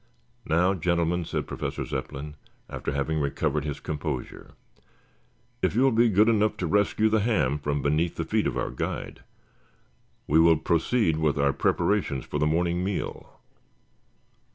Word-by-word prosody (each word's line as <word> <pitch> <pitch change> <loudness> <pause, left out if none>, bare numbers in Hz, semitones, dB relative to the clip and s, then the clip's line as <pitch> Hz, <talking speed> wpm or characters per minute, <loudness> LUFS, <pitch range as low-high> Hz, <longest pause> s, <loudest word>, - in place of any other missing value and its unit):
"Now, 90 +4 +3
gentlemen," 85 -1 0
said - - -3
Professor - - -4
Zepplin, 75 +2 -5 0.3
after - - -4
having 70 +3 -1
recovered 75 +1 -1
his 75 -1 -4
composure, 75 -3 -5 1.1
"if 95 +1 0
you 125 - +3
will 135 - +4
be 115 0 +4
good 105 +2 +4
enough 110 -2 +2
to 90 - -2
rescue 105 +4 +2
the 110 0 +2
ham 100 - +1
from 70 -1 -2
beneath 80 +4 +1
the - - -3
feet - - 0
of - - -2
our - - -2
guide, 60 - -5 1.0
we 80 +3 +3
will 80 -1 +6
proceed 85 +3 +1
with 75 -2 +1
our 70 -1 +2
preparations 85 -10 0
for 75 - -3
the 75 - +2
morning 85 +2 0
meal. 95 0 -5
80 Hz, 155 wpm, -26 LUFS, 75-100 Hz, 1.1 s, will